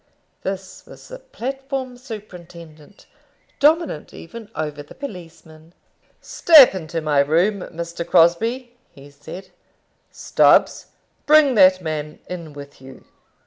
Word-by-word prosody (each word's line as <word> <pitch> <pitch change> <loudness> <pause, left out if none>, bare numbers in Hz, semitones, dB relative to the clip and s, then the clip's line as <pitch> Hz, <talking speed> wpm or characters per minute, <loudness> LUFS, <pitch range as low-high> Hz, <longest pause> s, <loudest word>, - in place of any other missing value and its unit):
This 190 -1 -7
was - - -15
the - - -10
platform 270 - -6
superintendent, 180 - -13 0.5
dominant 310 - +1
even 215 +5 -11
over 150 -2 -5
the 145 - -15
policemen. 165 - -12 0.5
"Step 305 -9 +6
into 165 -3 -5
my 150 -2 0
room, 170 +9 +1
Mr. 170 0 -7
Crosbie," 225 +10 +1
he 140 +1 -16
said. 180 +7 -12 0.6
"Stubbs, - - +2 0.4
bring 300 -3 +5
that 185 -4 +4
man 155 -1 -5
in 170 -4 -8
with 140 -1 -13
you." 135 0 -14
180 Hz, 110 wpm, -20 LUFS, 155-245 Hz, 0.6 s, Step